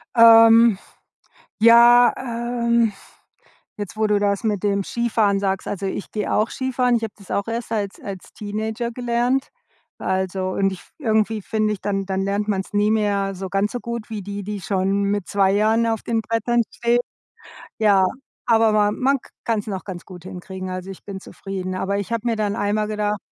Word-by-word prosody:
Ähm, 230 -1 +7 0.8
ja, 235 +2 +7
ähm, 235 -2 0 0.9
jetzt, 205 0 -6
wo 215 0 +2
du 210 -1 +2
das 200 +1 0
mit 210 -4 0
dem 200 -1 0
Skifahren 220 -4 +1
sagst, 195 -1 -1
also, 195 -1 -3
ich 195 - -5
gehe 210 -1 -2
auch 215 +2 +1
Skifahren, 250 -2 0
ich 230 - -2
habe 220 - -6
das 200 -3 -16
auch 200 +2 -1
erst 230 0 -4
als 205 -3 -3
als 195 -2 -8
Teenager 220 +3 -3
gelernt. 245 +2 0 0.5
Also, 190 0 -1
und 195 +1 0
ich 190 - -8
f - - -22
irgendwie 220 -5 +1
finde 215 +1 -1
ich, 205 - -5
dann 195 -1 -2
dann 190 0 -2
lernt 200 +2 -1
man's 195 -2 -2
nicht 205 +1 +2
mehr 200 -2 0
so 190 +1 -6
ganz 195 +2 0
so 245 - -3
gut 235 -1 -6
wie 215 -2 -4
die, 200 +1 -6
die 205 +1 -5
schon 195 +1 0
mit 200 -1 -1
2 195 -1 +2
Jahren 220 +3 +2
auf 225 -2 -1
den 230 -1 -1
Brettern 230 +2 0
stehen. 235 +1 +1 0.8
Ja, 205 -4 +4 0.4
aber 225 -2 +4
ma 210 -1 +3
man 265 +6 +1
k - - -19
kann's 225 -2 -1
noch 190 -2 -4
ganz 185 -3 -7
gut 180 -3 -12
hinkriegen, 185 +1 -7
also 185 +1 -5
ich 195 - -11
bin 195 -1 -7
zufrieden. 190 -1 -6
Aber 200 +2 -1
ich 200 +3 -4
habe 230 0 -2
mir 230 -1 +1
dann 210 -1 -1
einmal 210 +1 0
gedacht, 210 -1 -1
210 Hz, 190 wpm, -22 LUFS, 195-230 Hz, 0.9 s, Ähm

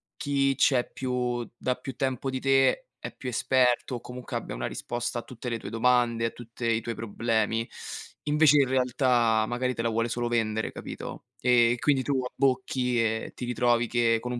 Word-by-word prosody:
chi 140 -1 +1
c'è 130 -3 +3
più 125 -2 -2
da 125 - -1
più 130 +1 -8
tempo 130 -1 -1
di 130 0 -2
te 135 - +3 0.3
è - - -6
più 130 - -5
esperto 125 +1 +2
o 120 - -6
comunque 125 0 -9
abbia - - -4
una - - -3
risposta 120 0 -3
a - - -5
tutte 125 0 -7
le 115 -1 -2
tue - - -7
domande, 115 0 +2
a - - +1
tutte 120 0 -8
i 115 0 +1
tuoi 115 +1 -4
problemi. 115 0 -1 0.5
Invece, 150 0 +5
in - - -2
realtà, 125 -3 +2
magari 125 +2 -1
te 115 - -2
la 115 - +1
vuole 115 +1 0
solo 120 +1 -1
vendere, 110 -2 0
capito? - - -8
E 120 -1 +4
quindi 140 -1 +2
tu 135 0 0
abbocchi 125 -1 0
e 110 0 0
ti 125 - -5
ritrovi 120 -1 +2
che 115 -1 +2
con 125 +2 -5
un 120 - -3
120 Hz, 190 wpm, -27 LUFS, 115-130 Hz, 0.5 s, Invece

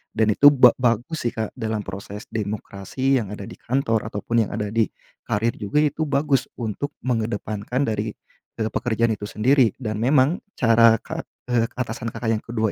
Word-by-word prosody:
Dan 110 -1 +3
itu 145 +7 +6
ba 130 -4 +8
bagus 120 +4 0
sih - - -3
Kak 110 -1 -2
dalam 110 -2 -2
proses 100 +2 -7
demokrasi 110 +5 -1
yang 110 - -4
ada 100 - -8
di - - -10
kantor, 115 -4 0
ataupun 110 +1 0
yang - - -6
ada 105 -2 -3
di 110 -1 +2 0.4
karir 110 +3 +1
juga, 150 +9 +1
itu 150 +1 0
bagus 140 -1 +1
untuk 120 +5 -4
mengedepankan 115 0 -1
dari, 110 -3 -2 0.4
eee, 110 -1 -2
pekerjaan 115 -1 +1
itu 105 -1 -4
sendiri. 120 +1 +3
Dan 110 -4 -4
memang 135 - +3 0.2
cara 115 -1 +5
ka - - -6 0.2
eee, 115 -1 +3
atasan 115 -2 -4
Kakak 115 0 -2
yang - - -21
ke-2 110 -2 -1
115 Hz, 175 wpm, -23 LUFS, 110-130 Hz, 0.4 s, ba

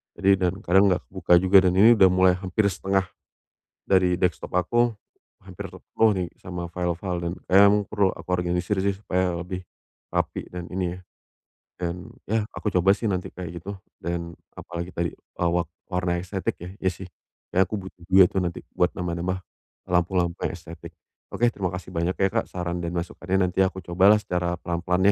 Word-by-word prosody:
jadi 95 0 +3
dan 95 +5 -4
kadang 95 +3 +5
enggak 90 -1 0
kebuka 90 -2 0
juga. 95 +2 +5
Dan 90 - -1
ini 110 +5 +8
udah 95 -3 +6
mulai 90 0 +4
hampir 95 +3 -1
1/2 95 0 0 0.8
dari 90 -2 +3
desktop 90 -1 -1
aku 120 +6 +2 0.5
hampir 95 -2 -8
penuh 110 -1 +1
nih 90 -2 -2
sama 90 -1 -6
file-file 90 +1 -2
dan 85 0 -2
kayaknya 100 +2 +6
emang 105 0 +3
perlu 100 -2 +1
aku - - -12
organisir 90 +2 0
sih, 100 0 0
supaya 90 -3 -1
lebih 90 +1 -5 0.5
rapi - - -2
dan 90 -1 -7
ini 90 -1 -2
ya - - -12 0.8
dan, 85 -1 -2 0.3
ya 110 +2 +1 0.2
aku 105 - -2
coba 95 +2 +4
sih 115 - -6
kayak 90 -2 -4
gitu 100 +2 -6 0.3
dan 85 0 -3 0.2
apalagi 85 +1 -6
tadi, 85 -2 -1
eee, 85 -1 -3
wak 85 0 0 0.2
warna 90 -1 0
estetik 95 +2 -3
ya. 85 - -8
Iya 95 - +2
sih, 90 +1 -8 0.5
kayak 95 0 +3
aku - - -2
butuh 95 - -12
duit 95 -1 +7 0.4
buat 90 - +2
nambah-nambah 90 +1 -2 0.5
lampu-lampu 90 -1 +1
yang - - -6
estetik. - - -11 0.3
Oke, 120 0 +1
terima 95 -3 -2
kasih 90 - -8
banyak 85 +2 0
ya, 95 - +3
Kak, - - 0
saran 90 -1 -4
dan 85 +1 -4
masukannya. 90 +2 -1
Nanti 90 - -4
aku 95 -1 0
cobalah 95 +5 +5
secara 90 -4 -2
pelan-pelan 90 +3 +2
90 Hz, 175 wpm, -25 LUFS, 90-95 Hz, 0.8 s, ini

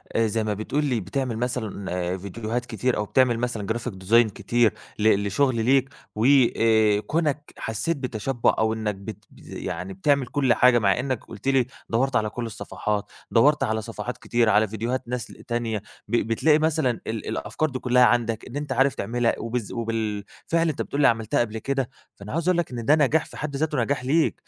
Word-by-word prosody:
آآ 115 0 +3
زي 110 +1 -1
ما 105 - -1
بتقول 125 +8 -1
لي 125 -5 0
بتعمل 115 +5 -3
مثلًا 100 -7 -3
فيديوهات 110 +5 -4
كتير 120 +1 -1
أو 105 - -1
بتعمل 120 +1 +2
مثلًا 115 -4 -2
graphic 120 +1 -4
design 115 +4 +5
كتير 115 +3 +1 0.3
ل 105 -1 +3
لشغل 130 +5 +2
ليك، 135 +1 +3 0.3
و 110 +2 0 0.3
آآ 110 -2 +4
كونك 150 +2 -2
حسيت 130 +9 -2
بتشبُّع 125 -1 0
أو 110 0 +2
إنك 110 -2 -2
بت 100 +1 -9
يعني 90 +3 -6
بتعمل 140 +8 +2
كل 135 -2 +2
حاجة 125 -1 +5
مع 100 +1 +2
إنك 130 -2 -2
قلت - - -10
لي 135 -2 +3 0.2
دوَّرت 130 +3 +1
على 110 -1 +2
كل 120 +2 -5
الصفحات، 105 -1 -4 0.2
دوَّرت 145 +6 +4
على 110 0 0
صفحات 115 +2 -6
كتير 120 -1 +1
على 110 +1 +4
فيديوهات 115 +5 -3
ناس 125 -1 -3 0.2
تانية، 120 -2 -1 0.3
ب 110 - -1
بتلاقي 150 +7 +3
مثلًا 155 -4 +2 0.2
ال 110 -1 -4
الأفكار 155 - -2
دي 130 -1 -4
كلها 125 0 +4
عندك 115 -3 +1
إن 125 - -9
أنت 145 0 -4
عارف 135 -1 +3
تعملها 120 +3 0
وبالذ 115 -2 -3
وبالفعل 115 +8 -2
أنت 150 - -3
بتقول 145 - -2
لي - - +7
عملتها 115 -1 +1
قبل 110 -2 -1
كده، 135 +2 -2 0.3
فأنا 100 +1 -9
عايز 165 +2 -1
أقول 180 - +3
لك 170 -5 -1
إن 120 -2 -5
ده 145 - +6
نجاح 155 +1 +2
في - - -12
حد 145 -2 -5
ذاته 150 +1 -1
نجاح 135 +1 -1
ليك؛ 155 +5 +3
120 Hz, 190 wpm, -24 LUFS, 110-135 Hz, 0.3 s, لي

